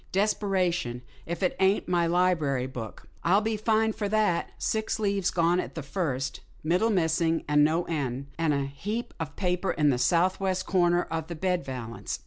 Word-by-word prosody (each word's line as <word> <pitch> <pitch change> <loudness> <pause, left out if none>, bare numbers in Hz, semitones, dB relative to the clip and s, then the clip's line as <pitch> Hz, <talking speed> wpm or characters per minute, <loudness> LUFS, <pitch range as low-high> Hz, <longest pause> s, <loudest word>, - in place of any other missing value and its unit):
"Desperation! 185 - 0 0.2
if 170 +2 -3
it 180 - +1
ain't 190 +1 +2
my 175 -2 +2
library 165 -7 +2
book. 125 -5 -8 0.2
I'll 185 +4 +4
be 220 +1 -1
fined 220 +1 +1
for 205 -2 -2
that. 210 -5 +1
Six 220 0 -1
leaves 200 -3 +1
gone 170 +1 +2
at - - -5
the 160 - -4
first 140 -4 -2
— - - -29
middle 180 +8 +2
missing, 165 -4 +1
and 150 0 +4
no 160 +3 +2
end 140 -5 -3
— - - -27
and 165 -2 +2
a 140 -1 0
heap 205 - -4
of 155 -3 -5
paper 180 0 -1
in 150 -2 +3
the 125 - 0
southwest 185 +5 +1
corner 175 -2 +3
of 160 -1 -2
the 170 - -5
bed 180 +1 0
valance. 120 -3 -5
175 Hz, 185 wpm, -27 LUFS, 150-195 Hz, 0.2 s, I'll